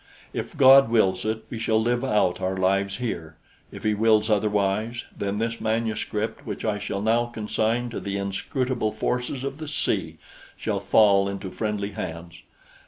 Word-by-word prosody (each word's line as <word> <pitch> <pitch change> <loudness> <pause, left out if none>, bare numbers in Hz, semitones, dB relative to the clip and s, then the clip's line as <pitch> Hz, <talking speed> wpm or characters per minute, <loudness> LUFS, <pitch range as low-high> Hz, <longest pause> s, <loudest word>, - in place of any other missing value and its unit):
If - - -5
God 135 -1 +8
wills 95 -5 +2
it, 110 0 -2
we 115 - -4
shall 110 -1 +2
live 120 +2 0
out 105 -8 +1
our 95 0 -1
lives 95 +1 +1
here. 80 -10 -4 0.3
If - - -10
He 110 -1 +2
wills 110 0 +3
otherwise, 105 +3 0
then 100 0 -2
this 115 +1 -2
manuscript 110 -1 -2
which - - -5
I 105 -2 0
shall 100 -1 -3
now 115 +2 +2
consign 115 +1 -1
to - - -4
the 100 0 -3
inscrutable 110 +4 -2
forces 125 +1 -2
of 140 +2 -4
the 155 - -6
sea 150 - -1 0.4
shall - - -2
fall 100 -2 +4
into 100 -1 -5
friendly 105 -2 -2
hands. 85 -3 -7
110 Hz, 165 wpm, -25 LUFS, 100-115 Hz, 0.4 s, God